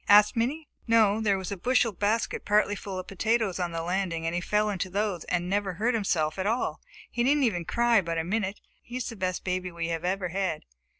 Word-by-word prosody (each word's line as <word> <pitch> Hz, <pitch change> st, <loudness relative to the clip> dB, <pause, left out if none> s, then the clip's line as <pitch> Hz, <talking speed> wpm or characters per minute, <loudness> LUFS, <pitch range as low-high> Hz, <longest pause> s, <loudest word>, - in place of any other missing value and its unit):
asked 210 Hz, +3 st, +7 dB
Minnie. 280 Hz, +7 st, -1 dB, 0.2 s
"No, 220 Hz, -2 st, +4 dB
there 205 Hz, -3 st, +2 dB
was 190 Hz, +1 st, -5 dB
a 200 Hz, -, -3 dB
bushel 245 Hz, +3 st, +2 dB
basket 210 Hz, +4 st, -1 dB
partly 205 Hz, 0 st, +3 dB
full 195 Hz, -2 st, -6 dB
of 185 Hz, -, -4 dB
potatoes 215 Hz, -1 st, 0 dB
on 175 Hz, -1 st, -1 dB
the 165 Hz, 0 st, -3 dB
landing, 175 Hz, -2 st, -1 dB
and 165 Hz, -, -1 dB
he 175 Hz, -, -1 dB
fell 210 Hz, +3 st, +1 dB
into 190 Hz, -1 st, -2 dB
those 200 Hz, -3 st, -1 dB
and 175 Hz, 0 st, -1 dB
never 195 Hz, 0 st, 0 dB
hurt 225 Hz, +7 st, 0 dB
himself 175 Hz, -7 st, 0 dB
at 190 Hz, -, 0 dB
all. 230 Hz, +3 st, -1 dB, 0.3 s
He 240 Hz, -, 0 dB
didn't 285 Hz, +3 st, +3 dB
even 180 Hz, -9 st, +1 dB
cry 235 Hz, 0 st, +3 dB
but 165 Hz, -2 st, -3 dB
a 165 Hz, -, 0 dB
minute. 195 Hz, +2 st, -2 dB, 0.2 s
He 245 Hz, +1 st, -7 dB
is 255 Hz, -, -3 dB
the 230 Hz, -, -7 dB
best 185 Hz, -2 st, -2 dB
baby 180 Hz, 0 st, -2 dB
we 170 Hz, -1 st, -3 dB
have 165 Hz, 0 st, -2 dB
ever 185 Hz, 0 st, -1 dB
had." 185 Hz, -3 st, -2 dB
195 Hz, 230 wpm, -28 LUFS, 180-220 Hz, 0.3 s, asked